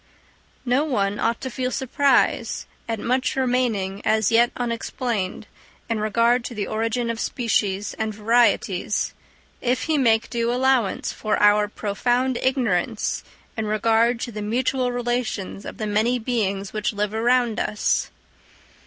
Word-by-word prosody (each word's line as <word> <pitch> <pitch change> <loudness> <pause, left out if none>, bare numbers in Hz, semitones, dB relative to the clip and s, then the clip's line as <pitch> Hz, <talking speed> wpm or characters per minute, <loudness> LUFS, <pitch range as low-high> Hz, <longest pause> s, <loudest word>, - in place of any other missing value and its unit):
No 255 +4 +2
one 205 -9 0
ought 230 0 0
to 260 - -4
feel 255 +1 -2
surprise 270 +2 +1 0.2
at 225 -1 -1
much 255 +3 0
remaining 240 -7 0
as 220 -1 +2
yet 235 +1 +4
unexplained 230 -4 -3 0.5
in 225 - 0
regard 230 +3 +2
to 240 - -6
the 205 -1 -2
origin 230 +3 -1
of 230 - -6
species 205 -5 -1
and 220 0 -1
varieties, 215 -3 +1 0.5
if 250 +1 0
he 315 -2 +1
make 225 -4 +3
due 235 -1 0
allowance 255 -4 +1
for 215 - -1
our 210 0 +4
profound 240 +5 0
ignorance 235 -5 0 0.3
in 220 -1 -2
regard 225 +2 +2
to 240 - -3
the 210 -1 -6
mutual 250 +4 0
relations 240 -5 -3
of - - -7
the 215 - -3
many 215 +4 +1
beings 205 -5 -2
which 215 0 -1
live 210 0 -2
around 240 0 +2
us. 210 - 0
230 Hz, 140 wpm, -23 LUFS, 210-245 Hz, 0.5 s, yet